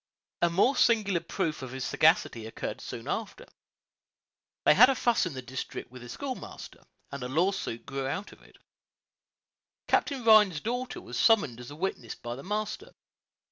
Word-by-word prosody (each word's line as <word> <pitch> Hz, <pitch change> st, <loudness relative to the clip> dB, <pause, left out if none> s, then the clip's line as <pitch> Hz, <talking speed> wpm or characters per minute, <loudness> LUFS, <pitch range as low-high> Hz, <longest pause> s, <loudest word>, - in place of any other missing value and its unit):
A 175 Hz, -, +4 dB
more 200 Hz, +11 st, +3 dB
singular 210 Hz, -7 st, +3 dB
proof 155 Hz, -2 st, -3 dB
of 130 Hz, -1 st, -7 dB
his 130 Hz, -1 st, -4 dB
sagacity 120 Hz, -8 st, +2 dB
occurred 115 Hz, -, -6 dB
soon -, -, -7 dB
after. -, -, -4 dB, 1.2 s
They -, -, +7 dB
had 250 Hz, +6 st, +8 dB
a 270 Hz, -, +2 dB
fuss 240 Hz, -6 st, +2 dB
in 155 Hz, -, -7 dB
the 130 Hz, -, -6 dB
district 130 Hz, -1 st, -6 dB
with 125 Hz, -1 st, -11 dB
the 120 Hz, -, -10 dB
schoolmaster, 265 Hz, -, -7 dB, 0.3 s
and 140 Hz, -1 st, -6 dB
a 125 Hz, -, -3 dB
lawsuit 170 Hz, -5 st, -1 dB
grew 135 Hz, -1 st, -3 dB
out 200 Hz, +9 st, -4 dB
of -, -, -17 dB
it. -, -, -20 dB, 1.3 s
Captain 275 Hz, -4 st, +1 dB
Rhines's 210 Hz, -7 st, +6 dB
daughter 245 Hz, +2 st, -3 dB
was -, -, -6 dB
summoned 200 Hz, -, +3 dB
as 125 Hz, -, -9 dB
a 145 Hz, -, -9 dB
witness 155 Hz, -, -4 dB
by 120 Hz, 0 st, -6 dB
the 135 Hz, -, -9 dB
master. 215 Hz, -, -4 dB
175 Hz, 170 wpm, -29 LUFS, -, 1.3 s, had